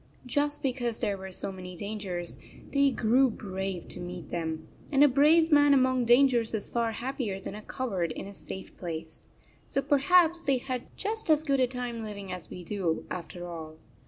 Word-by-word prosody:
Just 290 Hz, +3 st, 0 dB
because 245 Hz, -4 st, -1 dB
there 200 Hz, -, 0 dB
were 190 Hz, 0 st, -8 dB
so 190 Hz, -, -4 dB
many 180 Hz, -1 st, -8 dB
dangers, 195 Hz, -3 st, -4 dB, 0.3 s
they 280 Hz, 0 st, +5 dB
grew 255 Hz, +2 st, +3 dB
brave 190 Hz, -4 st, -4 dB
to -, -, -5 dB
meet 175 Hz, -3 st, -7 dB
them, 160 Hz, -2 st, -3 dB, 0.2 s
and 280 Hz, 0 st, +6 dB
a -, -, +9 dB
brave 310 Hz, +5 st, +5 dB
man 290 Hz, -1 st, +6 dB
among 260 Hz, -2 st, +3 dB
dan 245 Hz, +4 st, +7 dB
gers 235 Hz, -3 st, +1 dB
is 210 Hz, -, -4 dB
far 230 Hz, -1 st, 0 dB
happier 235 Hz, -5 st, -3 dB
than 195 Hz, -, -6 dB
a 210 Hz, -, -7 dB
coward 195 Hz, -9 st, -2 dB
in -, -, -6 dB
a 200 Hz, -, -9 dB
safe 190 Hz, 0 st, -8 dB
place. 160 Hz, -2 st, -6 dB, 0.5 s
So -, -, 0 dB
perhaps 335 Hz, +4 st, +4 dB
they 275 Hz, -5 st, +1 dB
had 250 Hz, 0 st, -4 dB
just 435 Hz, -1 st, -1 dB
as 310 Hz, -1 st, +5 dB
good 275 Hz, -3 st, +1 dB
a 255 Hz, -, +4 dB
time 245 Hz, -2 st, -4 dB
living 200 Hz, -3 st, -6 dB
as 180 Hz, -1 st, -5 dB
we 180 Hz, -, -8 dB
do, 175 Hz, -3 st, -1 dB
after 175 Hz, 0 st, -6 dB
all. 160 Hz, -2 st, -8 dB
225 Hz, 190 wpm, -29 LUFS, 185-270 Hz, 0.5 s, a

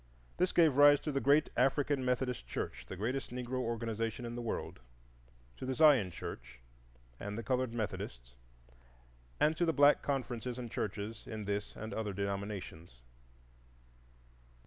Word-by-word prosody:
This 180 Hz, 0 st, +2 dB
gave 160 Hz, -6 st, +4 dB
rise 145 Hz, 0 st, +8 dB
to 150 Hz, -, -2 dB
the 135 Hz, -1 st, 0 dB
great 145 Hz, +2 st, +4 dB
African 135 Hz, +2 st, +2 dB
Methodist 125 Hz, -, -1 dB
Church, -, -, -5 dB
the -, -, -5 dB
greatest 125 Hz, +8 st, -2 dB
Negro 125 Hz, +1 st, -3 dB
organization 115 Hz, -1 st, -2 dB
in 120 Hz, -, -5 dB
the 120 Hz, -, -4 dB
world, 115 Hz, -, -4 dB, 0.8 s
to -, -, -6 dB
the 130 Hz, -, -1 dB
Zion 140 Hz, -11 st, +6 dB
Church 85 Hz, -7 st, -8 dB, 0.6 s
and 105 Hz, +1 st, -5 dB
the 115 Hz, -, -4 dB
Colored 130 Hz, +1 st, 0 dB
Methodist, -, -, -5 dB, 1.1 s
and 155 Hz, +1 st, +3 dB
to 175 Hz, -, 0 dB
the 165 Hz, -1 st, +2 dB
black 145 Hz, 0 st, +6 dB
conferences 125 Hz, -3 st, -2 dB
and 120 Hz, -3 st, -6 dB
churches 105 Hz, +2 st, -4 dB
in 110 Hz, -1 st, -5 dB
this 100 Hz, 0 st, -3 dB
and 110 Hz, -1 st, -6 dB
other 105 Hz, -2 st, -2 dB
denominations. 100 Hz, -, -4 dB
120 Hz, 145 wpm, -33 LUFS, 105-135 Hz, 1.1 s, rise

